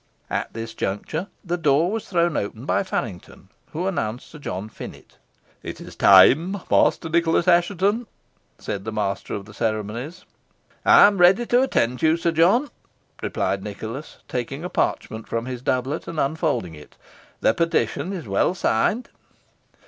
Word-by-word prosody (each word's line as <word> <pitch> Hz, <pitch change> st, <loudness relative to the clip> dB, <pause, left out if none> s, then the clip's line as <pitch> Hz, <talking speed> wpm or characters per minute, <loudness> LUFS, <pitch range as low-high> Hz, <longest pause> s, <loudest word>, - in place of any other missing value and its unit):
At -, -, -2 dB
this 115 Hz, 0 st, -5 dB
juncture, 135 Hz, -, -3 dB, 0.2 s
the 175 Hz, 0 st, -1 dB
door 155 Hz, +3 st, +3 dB
was 225 Hz, 0 st, -4 dB
thrown 170 Hz, -3 st, +1 dB
open 110 Hz, +4 st, -4 dB
by -, -, +1 dB
Faryngton, 115 Hz, -, -5 dB, 0.2 s
who 170 Hz, +4 st, -3 dB
announced 125 Hz, -, -3 dB
Sir 150 Hz, -, -11 dB
John 100 Hz, -7 st, -5 dB
Finett. 110 Hz, -, -11 dB, 0.4 s
"It -, -, -7 dB
is -, -, -10 dB
time, 150 Hz, -, +6 dB
Master -, -, +3 dB
Nicholas 170 Hz, +1 st, +2 dB
Assheton," 195 Hz, +6 st, +2 dB, 0.5 s
said 95 Hz, -, -5 dB
the 110 Hz, -, -4 dB
master 100 Hz, -2 st, -2 dB
of 100 Hz, -, -6 dB
the 105 Hz, -, -14 dB
ceremonies. 115 Hz, -, -3 dB, 0.6 s
"I -, -, +8 dB
am 200 Hz, -2 st, +3 dB
ready 185 Hz, +7 st, +5 dB
to 245 Hz, +2 st, +3 dB
attend 125 Hz, -, 0 dB
you, 160 Hz, +1 st, +3 dB
Sir 170 Hz, 0 st, 0 dB
John," 190 Hz, -, +3 dB, 0.5 s
replied 95 Hz, +1 st, -1 dB
Nicholas, 110 Hz, +7 st, -7 dB
taking 135 Hz, +5 st, -4 dB
a 180 Hz, -, -4 dB
parchment 110 Hz, -9 st, -2 dB
from 115 Hz, 0 st, -2 dB
his 125 Hz, -1 st, -5 dB
doublet, 130 Hz, +3 st, -1 dB
and 160 Hz, -, -4 dB
unfolding 145 Hz, -, -1 dB
it, 75 Hz, -1 st, -14 dB, 0.5 s
"the -, -, +4 dB
petition 165 Hz, -, 0 dB
is 175 Hz, -, -6 dB
well 100 Hz, -, +1 dB
signed." 195 Hz, -, +1 dB
150 Hz, 155 wpm, -23 LUFS, 110-175 Hz, 0.6 s, I